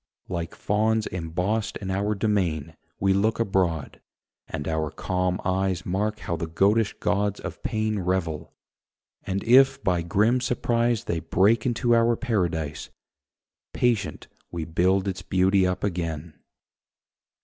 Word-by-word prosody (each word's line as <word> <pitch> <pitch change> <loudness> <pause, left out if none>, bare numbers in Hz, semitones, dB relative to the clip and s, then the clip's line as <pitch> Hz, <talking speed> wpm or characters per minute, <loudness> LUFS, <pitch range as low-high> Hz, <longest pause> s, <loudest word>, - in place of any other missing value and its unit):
Like 85 -2 -4
fauns 110 +1 +1
embossed 90 +5 -2
in 95 -2 -5
our 100 +3 0
domain, 95 -8 -1 0.2
We 95 0 +3
look 105 +4 +1
abroad, 90 -8 0 0.5
and 75 -3 -5
our 80 -1 -1
calm 90 +3 -1
eyes 95 -1 0
Mark 105 +4 -1
how 85 - -2
the 85 0 -4
goatish 100 +7 +2
gods 105 0 0
of 90 -4 -7
pain 110 -2 -1
Revel; 85 -4 -2 0.8
and 95 +1 -1
if 135 +3 +5
by 90 -2 +1
grim 105 +9 +2
surprise 120 -2 +1
They 85 - -2
break 105 +7 +2
into 120 0 +1
our 115 0 +4
paradise, 85 - -2 0.8
Patient 115 -6 0 0.2
we 85 -2 -4
build 95 +4 +1
its 95 -1 -3
beauty 95 0 +2
up 90 - -2
again. 85 -4 -3
95 Hz, 130 wpm, -25 LUFS, 85-110 Hz, 0.8 s, if